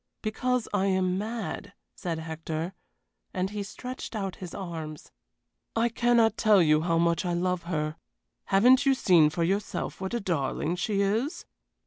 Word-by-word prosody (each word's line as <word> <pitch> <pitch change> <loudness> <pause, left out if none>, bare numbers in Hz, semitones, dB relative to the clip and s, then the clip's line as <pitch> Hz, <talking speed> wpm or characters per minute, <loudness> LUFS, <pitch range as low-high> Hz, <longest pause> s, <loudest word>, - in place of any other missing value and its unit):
"Because 250 +3 0
I 200 -1 +2
am 185 -1 +1
mad," 225 +3 -4 0.2
said 170 -3 -4
Hector, 160 +2 -4 0.6
and 185 +1 -1
he 210 -1 -3
stretched 250 +5 -7
out 195 -3 -3
his 180 -3 -8
arms. 160 -5 -6 0.6
"I 230 +1 +2
cannot 235 -1 +3
tell 215 -3 +5
you 155 -3 +4
how 165 0 +1
much 170 +2 +2
I 175 -1 -1
love 180 0 -1
her. 155 -2 -2 0.5
Haven't 250 +7 +5
you 275 -1 +4
seen 170 -10 +5
for 165 +2 -1
yourself 195 +2 -2
what 190 +4 -2
a - - 0
darling 170 - -1
she 200 +2 0
is? 220 - -1
190 Hz, 155 wpm, -28 LUFS, 170-220 Hz, 0.6 s, tell